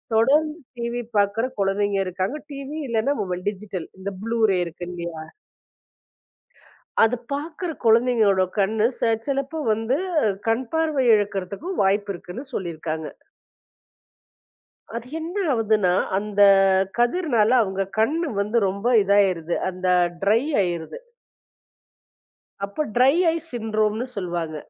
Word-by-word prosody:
தொடர்ந்து 300 +7 +3 0.2
டி.வி 235 +1 -3 0.2
பாக்கிற 205 +4 +2 0.2
குழந்தைங்க 200 +1 +1
இருக்காங்க. 190 +10 -2
டி.வி 275 +2 -6
இல்லைன்னா 235 +4 +1
மொபைல், 180 -2 -4
டிஜிட்டல் 195 -3 -7
இந்த 200 +1 -4
ப்ளூ 230 0 -2
ரே 185 - +2
இருக்கு 175 +1 -7
இல்லையா? 170 -2 -6 1.8
அது 230 +2 +3 0.2
பாக்கிற 315 +5 -4 0.2
குழந்தைங்களோட 225 -4 +4
கண்ணு 215 +3 +2
ச - - -24 0.3
சிலப்போ 275 +3 -2
வந்து 225 +5 0 0.5
கண்பார்வை 270 +4 0
இழக்கறதுக்கும் 205 - -2
வாய்ப்பு 200 +1 +1
இருக்குன்னு 200 +11 -8
சொல்லி 175 -3 -3
இருக்காங்க. 155 0 -4 1.9
அது 235 +1 -5
என்ன 330 +3 -5 0.2
ஆவுதுன்னா, 215 -6 +2 0.3
அந்தக் 195 -2 +4
கதிர்னால 240 -3 +2
அவுங்க 195 -1 -1
கண்ணு 310 +7 +1
வந்து 215 +3 +1
ரொம்ப 200 +5 -2 0.2
இதாயிருது. 190 -4 +2
அந்த 185 0 -4 0.4
ட்ரை 220 +6 +3 0.2
ஆயிருது. 175 - -3 1.7
அப்ப 200 +10 -3
ட்ரை 260 +3 +5 0.2
ஐ - - -2
சின்ட்ரோம்ன்னு 220 0 -1
சொல்லுவாங்க. 170 -4 -3
215 Hz, 110 wpm, -23 LUFS, 190-250 Hz, 1.9 s, ட்ரை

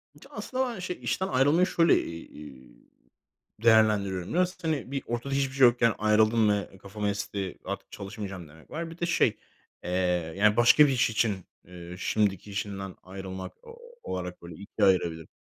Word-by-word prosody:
Ya, - - -19
aslında 260 0 -2
ben, 195 - -8
şey, 180 0 -5
işten 190 - -1
ayrılmayı 145 +7 +3
şöyle, 170 -3 +4
eee, 75 -6 -10 0.9
değerlendiriyorum. 105 -5 +3
Biraz, 180 0 0
hani, 155 -5 -2
bir 140 -1 -2
ortada 120 +4 -3
hiçbir 135 -1 0
şey 135 -2 +7
yokken 120 -1 +3
"Ayrıldım 110 +1 +3
ve 100 -2 -2
kafam 100 +2 -6
esti, 100 -2 -3
artık - - -6
çalışmayacağım." 95 -3 -7
demek 80 +1 -18
var. 165 +2 -4
Bir 165 - -12
de, 170 - 0
şey, 165 -9 +2 0.5
eee, - - -5 0.5
yani, 105 +1 +4
başka 120 +5 +7
bir - - +1
iş 125 -3 +2
için, 110 -2 +1 0.3
ııı, 90 0 -10
şimdiki 100 0 0
işinden 100 -1 -5
ayrılmak 95 0 -7
o 470 0 -12 0.3
olarak 90 0 -5
ikiye 100 +5 -1
ayırabilirim. 85 -4 +1
105 Hz, 160 wpm, -28 LUFS, 95-135 Hz, 0.9 s, şey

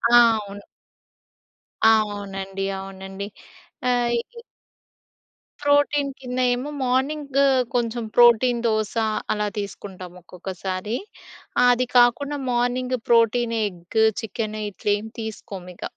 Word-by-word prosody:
ఆ! - - +10 0.2
అవును. 200 0 -9 1.2
ఆ! - - +6 0.3
అవునండి, 195 -1 -5
అవునండి. 195 +1 -7 0.6
ఆహ్, 245 -1 +2
ఇ 470 - -8 1.2
ప్రోటీన్ 285 0 +3
కింద 250 -1 -5 0.2
ఏమో 255 +4 -4
మార్నింగ్ 275 +2 -1 0.4
కొంచెం 235 -1 -1
ప్రోటీన్ 240 0 +5
దోస 215 -2 0 0.4
అలా 210 0 0
తీసుకుంటాం 190 -3 -7
ఒక్కొక్కసారి. 185 +4 -5 0.7
ఆహ్, 245 - +6
అది 250 +1 -1
కాకుండా 275 +4 +4
మార్నింగ్ 250 +1 0
ప్రోటీన్ 230 0 +3
ఎగ్, 180 +2 -3 0.2
చికెన్ 215 0 -4
ఇట్లేమి 205 +2 -2
తీసుకోమిక. 195 -5 -8
225 Hz, 100 wpm, -23 LUFS, 195-245 Hz, 1.2 s, ఆ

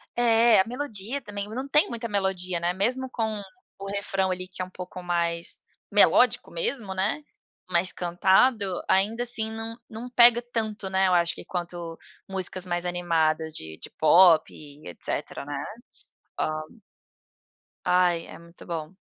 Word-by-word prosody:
É, 230 -2 +5
a 190 - +4
melodia 250 -1 -4
também, 205 -2 -6
não 260 +5 -5
tem 300 +2 +4
muita 235 -1 -4
melodia, 190 -4 -1
né, 175 +1 0
mesmo 250 +8 0
com 220 -4 -2 0.4
o 195 - -7
refrão, 195 -1 -1
ali, 185 0 -3
que 185 0 -8
é 185 - -1
um - - -14
pouco 180 0 -8
mais 170 -1 -2 0.3
melódico - - +4
mesmo, 270 - -2
né, 205 +11 -1 0.4
mais 180 +1 +1
cantado, 190 +3 +2
ainda 215 +5 +2
assim, 225 -2 -2
não 225 +1 -6
não 235 +3 -8
pega 240 -1 +7
tanto, 220 -3 -3
né, 190 0 +2
eu 180 - +3
acho 170 -1 +2
que - - -10
quanto 175 -2 -5 0.3
músicas 190 -1 -4
mais 175 0 -1
animadas 160 -3 0
de 80 0 -6
de - - -10
pop 165 +1 +6
e 145 0 -13
etcetera, 90 - -5
né. 145 -1 -4 0.8
Hã - - +1 1.4
Ai, 180 -2 +2
é - - -10
muito 170 +1 -15
bom. 165 -1 -5
190 Hz, 155 wpm, -26 LUFS, 175-225 Hz, 1.4 s, pega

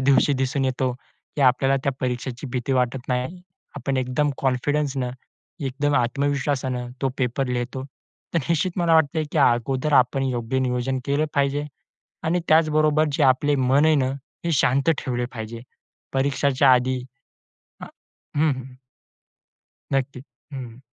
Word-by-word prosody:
दिवशी 140 +2 +4
दिसून 135 +1 0
येतो 130 -1 0 0.4
की - - -1
आपल्याला 135 +1 +4
त्या 140 - +1
परीक्षेची 125 +1 -3
भीती 125 +1 -1
वाटत 125 0 0
नाही. 130 +8 -2 0.4
आपण 135 -1 -2
एकदम 130 +3 0
कॉन्फिडन्सनं, 135 0 0 0.5
एकदम 140 +1 -1
आत्मविश्वासानं 130 0 -1
तो 135 - +2
पेपर 125 +1 0
लिहतो. 125 +2 -3 0.5
तर - - +4
निश्चित 170 +2 +1
मला 170 -1 +3
वाटते 160 0 +3
की 155 - +1
अगोदर 130 +3 +2
आपण 130 +1 +3
योग्य 125 0 -1
नियोजन 130 0 0
केलं 145 +2 +1
पाहिजे 140 +1 +1 0.6
आणि 175 +2 +1
त्याचबरोबर 155 -1 +4
जे 150 - +2
आपले 140 +2 +3
मन 135 +3 +3
आहे 160 -1 +5
ना, 130 -2 +1 0.4
हे 170 - +1
शांत 135 +3 +3
ठेवले 125 -1 -2
पाहिजे. 115 0 -6 0.5
परीक्षांच्या 135 0 +3
आधी. 125 +1 +1 0.8
अ - - -5 0.5
हम्म, 155 +1 +4
हम्म. 130 0 -9 1.2
नक्की. 135 -1 -1 0.3
हं. 125 -2 -7
135 Hz, 135 wpm, -23 LUFS, 125-145 Hz, 1.2 s, आहे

